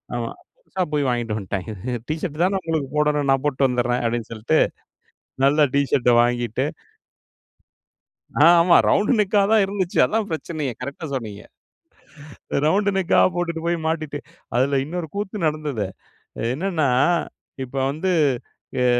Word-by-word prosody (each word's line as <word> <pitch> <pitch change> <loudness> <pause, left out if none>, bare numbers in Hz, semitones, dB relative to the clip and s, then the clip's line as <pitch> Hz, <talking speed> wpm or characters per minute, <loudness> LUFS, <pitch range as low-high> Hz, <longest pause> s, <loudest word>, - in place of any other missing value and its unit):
ஆமா. - - -2 0.3
புதுசா 190 - -3
போய் 145 -2 +1
வாங்கிட்டு 120 -3 -1
வந்துட்டாங்க. 100 0 -4 0.4
"டீ 155 - -1
ஷர்ட் 160 -3 -3
தான 195 +2 +2
உங்களுக்கு 160 -4 -2
போடணும். 150 -1 +1
நான் 135 -1 +3
போட்டுட்டு 140 -2 +2
வந்துர்றேன்" 125 0 0
அப்டின்னு 115 -1 -2
சொல்லிட்டு. 115 +8 +1 0.9
நல்ல 145 +1 +4
டீ 140 - +4
ஷர்ட்ட 125 -2 +3
வாங்கிட்டு 120 -1 0 1.8
ஆ - - +8 0.2
ஆமா 170 0 +5
ரவுண்டு 205 +4 +3
நெக்கா 205 0 +3
தான் 220 -1 +5
இருந்துச்சு. 190 -2 -3
அதான் 220 -1 -1
பிரச்சனையே 155 -4 -3
கரெக்ட்டா 140 +5 -6
சொன்னீங்க. 110 -6 -5 1.2
ரவுண்டு 200 +6 +2
நெக்கா 190 -1 +3 0.2
போட்டுட்டு 170 -2 -2
போய் 170 0 +1
மாட்டிட்டு 155 -3 -2 0.4
அதில 135 +3 +2
இன்னொரு 170 +2 -4
கூத்து 205 -2 -3
நடந்தது. 150 -8 -2 0.7
என்னன்னா 160 -1 0 0.8
இப்போ 130 +2 -6
வந்து 160 +7 -2 0.7
அ - - +3
150 Hz, 135 wpm, -22 LUFS, 125-175 Hz, 1.8 s, ஆ